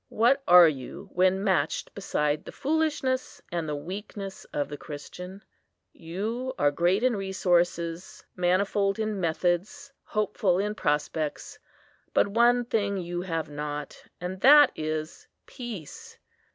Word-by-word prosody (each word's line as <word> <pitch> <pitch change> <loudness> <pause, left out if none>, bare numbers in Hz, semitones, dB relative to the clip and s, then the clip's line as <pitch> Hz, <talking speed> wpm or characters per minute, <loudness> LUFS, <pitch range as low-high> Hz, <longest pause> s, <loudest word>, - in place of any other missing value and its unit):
what 240 +5 +3
are 175 -1 +9
you 135 -5 -5
when 185 +2 +2
matched 190 -3 0
beside 150 -6 -1
the - - -9
foolishness 290 -4 -1
and 170 -3 -2
the 150 - -1
weakness 195 +5 -7
of 145 - -3
the 145 - -6
Christian? 180 +7 -9 0.5
You 220 +10 -4
are 145 - +3
great 175 +8 +1
in 255 -2 +3
resources, 175 -3 -1
manifold 195 +2 +1
in 215 -2 -2
methods, 175 - -1
hopeful 210 -3 0
in 205 +2 -1
prospects; 150 -2 -2 0.6
but - - +4
one 240 +3 +3
thing 200 -4 0
you 175 -1 -3
have 165 -3 -3
not,—and 150 +5 -6
that 290 +1 +8
is 155 0 -4 0.2
peace. 230 - -9
185 Hz, 125 wpm, -27 LUFS, 165-215 Hz, 0.6 s, are